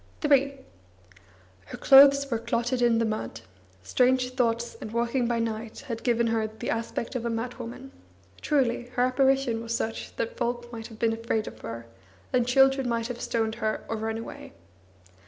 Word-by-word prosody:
III 275 Hz, -1 st, +3 dB, 1.1 s
Her -, -, -8 dB
clothes 280 Hz, 0 st, +7 dB
were 230 Hz, -, 0 dB
clotted 235 Hz, +2 st, -1 dB
in 235 Hz, -1 st, +4 dB
the 230 Hz, -, +2 dB
mud; 215 Hz, -, -4 dB, 0.4 s
strange 250 Hz, -, +2 dB
thoughts 235 Hz, -2 st, 0 dB
and 215 Hz, -, -6 dB
walking 235 Hz, +2 st, 0 dB
by 240 Hz, 0 st, 0 dB
night 225 Hz, -1 st, -4 dB
had 230 Hz, -3 st, -6 dB
given 235 Hz, -1 st, +2 dB
her 225 Hz, -1 st, 0 dB
the 220 Hz, 0 st, -5 dB
aspect 230 Hz, +1 st, -3 dB
of 250 Hz, -3 st, -3 dB
a 235 Hz, -, -1 dB
madwoman; 245 Hz, +3 st, -5 dB, 0.5 s
truly, 250 Hz, -4 st, +1 dB
her 245 Hz, -, +3 dB
apparition 265 Hz, -2 st, +2 dB
was 230 Hz, 0 st, -3 dB
such 225 Hz, 0 st, -4 dB
that 230 Hz, -, -3 dB
folk 240 Hz, 0 st, -2 dB
might 225 Hz, -1 st, -6 dB
have 225 Hz, -, -13 dB
been 225 Hz, 0 st, +1 dB
afraid 225 Hz, -1 st, -1 dB
of -, -, -9 dB
her, 115 Hz, 0 st, -7 dB, 0.5 s
and 245 Hz, -1 st, +2 dB
children 270 Hz, 0 st, +4 dB
might 230 Hz, 0 st, -1 dB
have 240 Hz, -1 st, -6 dB
stoned 225 Hz, -1 st, -1 dB
her 215 Hz, 0 st, -1 dB
or 225 Hz, -, -2 dB
run 220 Hz, 0 st, -3 dB
away. 225 Hz, -, -9 dB
235 Hz, 175 wpm, -27 LUFS, 225-255 Hz, 1.1 s, clothes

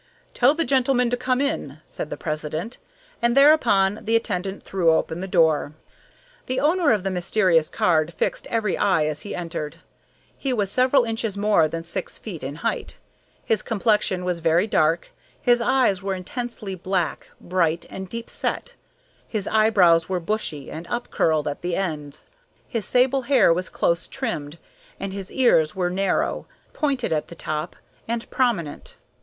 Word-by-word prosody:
"Tell 260 Hz, +4 st, +4 dB
the 330 Hz, 0 st, 0 dB
gentleman 255 Hz, -2 st, +2 dB
to -, -, +3 dB
come 255 Hz, +1 st, 0 dB
in," 280 Hz, -, -2 dB
said 150 Hz, -, -6 dB
the -, -, -5 dB
president, 155 Hz, +7 st, -4 dB, 0.4 s
and 235 Hz, +2 st, +2 dB
thereupon 225 Hz, -9 st, +5 dB
the 225 Hz, +1 st, +1 dB
attendant 195 Hz, -3 st, -2 dB
threw 185 Hz, -4 st, +1 dB
open 160 Hz, +1 st, 0 dB
the 190 Hz, -, -4 dB
door. 160 Hz, -5 st, +2 dB, 0.7 s
The 255 Hz, +1 st, -1 dB
owner 315 Hz, +2 st, +3 dB
of 210 Hz, -4 st, +1 dB
the 195 Hz, -, -1 dB
mysterious 180 Hz, -3 st, +2 dB
card 160 Hz, -1 st, +2 dB
fixed -, -, -2 dB
every 220 Hz, -4 st, 0 dB
eye 185 Hz, -6 st, +2 dB
as 150 Hz, -1 st, -3 dB
he 205 Hz, -, -5 dB
entered. 165 Hz, -4 st, -5 dB, 0.6 s
He 270 Hz, -2 st, -1 dB
was 205 Hz, -5 st, 0 dB
several 255 Hz, +2 st, +4 dB
inches 225 Hz, -3 st, -2 dB
more 200 Hz, -6 st, +3 dB
than 165 Hz, +1 st, -5 dB
six 170 Hz, +2 st, -5 dB
feet 185 Hz, -8 st, -7 dB
in 135 Hz, +2 st, -4 dB
height. 230 Hz, -, -2 dB, 0.5 s
His 220 Hz, -3 st, +1 dB
complexion 210 Hz, -4 st, +1 dB
was 180 Hz, -2 st, -1 dB
very 165 Hz, +3 st, +3 dB
dark, 165 Hz, -5 st, +1 dB, 0.3 s
his 240 Hz, -1 st, +3 dB
eyes 235 Hz, -6 st, +2 dB
were 195 Hz, 0 st, -2 dB
intensely 215 Hz, +1 st, -5 dB
black, 185 Hz, -2 st, -2 dB
bright, 170 Hz, -2 st, 0 dB
and 190 Hz, -1 st, -7 dB
deep 230 Hz, +2 st, -5 dB
set, -, -, -3 dB, 0.5 s
his 210 Hz, -4 st, -3 dB
eyebrows 190 Hz, -7 st, +4 dB
were 185 Hz, -1 st, 0 dB
bushy 165 Hz, -6 st, -3 dB
and 165 Hz, +2 st, -7 dB
up 240 Hz, 0 st, -4 dB
curled 155 Hz, -2 st, +1 dB
at 145 Hz, -, -4 dB
the 175 Hz, -1 st, -1 dB
ends, 150 Hz, -7 st, -4 dB, 0.4 s
his 230 Hz, -5 st, -3 dB
sable 260 Hz, +2 st, +3 dB
hair 255 Hz, -9 st, +4 dB
was 180 Hz, +2 st, -3 dB
close 170 Hz, 0 st, 0 dB
trimmed, 170 Hz, -, -4 dB, 0.4 s
and 195 Hz, -1 st, -4 dB
his 195 Hz, -1 st, -7 dB
ears 165 Hz, -12 st, +3 dB
were 180 Hz, -2 st, 0 dB
narrow, 195 Hz, +2 st, 0 dB, 0.3 s
pointed 270 Hz, -, 0 dB
at 155 Hz, -, -1 dB
the 170 Hz, -, -11 dB
top, 155 Hz, +1 st, -4 dB, 0.3 s
and 235 Hz, 0 st, -3 dB
prominent. 205 Hz, -, -1 dB
195 Hz, 165 wpm, -23 LUFS, 165-235 Hz, 0.7 s, thereupon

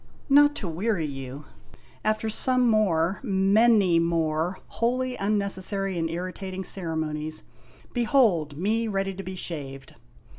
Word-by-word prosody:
Not 290 Hz, +1 st, +6 dB
to 195 Hz, -, -5 dB
weary 175 Hz, +1 st, -1 dB
you, 135 Hz, 0 st, -7 dB, 0.6 s
after 215 Hz, +1 st, 0 dB
some 255 Hz, +3 st, +3 dB
more, 195 Hz, -5 st, +2 dB
many 200 Hz, -3 st, +4 dB
more, 165 Hz, +1 st, 0 dB
wholly 255 Hz, +2 st, -1 dB
unnecessary 195 Hz, -1 st, -2 dB
and 165 Hz, 0 st, -1 dB
irritating 185 Hz, +2 st, -5 dB
cere 170 Hz, -4 st, -5 dB
monies, 155 Hz, 0 st, -3 dB, 0.5 s
behold 215 Hz, -, +2 dB
me 220 Hz, +6 st, 0 dB
ready 195 Hz, -2 st, -1 dB
to 190 Hz, -, -7 dB
be 185 Hz, 0 st, -7 dB
shaved 135 Hz, -6 st, -6 dB
190 Hz, 120 wpm, -26 LUFS, 165-215 Hz, 0.6 s, Not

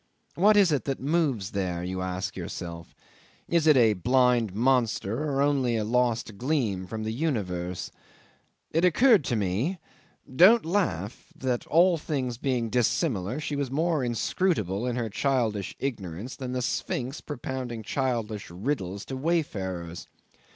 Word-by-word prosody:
What 210 Hz, +4 st, +4 dB
is 195 Hz, -5 st, +5 dB
it 145 Hz, -, 0 dB
that 135 Hz, -1 st, -2 dB
moves 140 Hz, -, 0 dB
there? 90 Hz, -3 st, -2 dB
you 95 Hz, +1 st, -3 dB
ask 90 Hz, 0 st, -3 dB
yourself. 85 Hz, -1 st, -7 dB, 0.5 s
Is 170 Hz, -2 st, +2 dB
it 150 Hz, -3 st, +7 dB
a 115 Hz, -3 st, +5 dB
blind 120 Hz, +2 st, +2 dB
monster 120 Hz, +1 st, +1 dB
or 140 Hz, 0 st, +1 dB
only 135 Hz, -5 st, +2 dB
a 110 Hz, -, 0 dB
lost 115 Hz, -2 st, 0 dB
gleam 120 Hz, -9 st, -1 dB
from 110 Hz, +1 st, -5 dB
the 110 Hz, 0 st, -2 dB
universe? 95 Hz, -, -2 dB, 0.8 s
It 165 Hz, +2 st, +1 dB
occurred 215 Hz, -, +5 dB
to 120 Hz, -, 0 dB
me 110 Hz, -, -1 dB, 0.6 s
don't 215 Hz, -, +7 dB
laugh 125 Hz, -, -2 dB
that 125 Hz, -2 st, -2 dB
all 170 Hz, +1 st, +4 dB
things 130 Hz, -6 st, -3 dB
being 125 Hz, -5 st, -1 dB
dissimilar, 120 Hz, -, 0 dB
she 150 Hz, -1 st, -3 dB
was 140 Hz, -2 st, -2 dB
more 155 Hz, +1 st, 0 dB
inscrutable 120 Hz, -, 0 dB
in 120 Hz, -, -1 dB
her 120 Hz, -2 st, -1 dB
childish 110 Hz, -3 st, -1 dB
ignorance 110 Hz, -3 st, -4 dB
than 130 Hz, -2 st, -5 dB
the 125 Hz, -1 st, -1 dB
Sphinx 130 Hz, +2 st, -2 dB
propounding 130 Hz, -4 st, -5 dB
childish 115 Hz, -5 st, -2 dB
riddles 100 Hz, 0 st, -3 dB
to 135 Hz, -, -5 dB
wayfarers. 95 Hz, -, -2 dB
125 Hz, 145 wpm, -27 LUFS, 100-145 Hz, 0.8 s, it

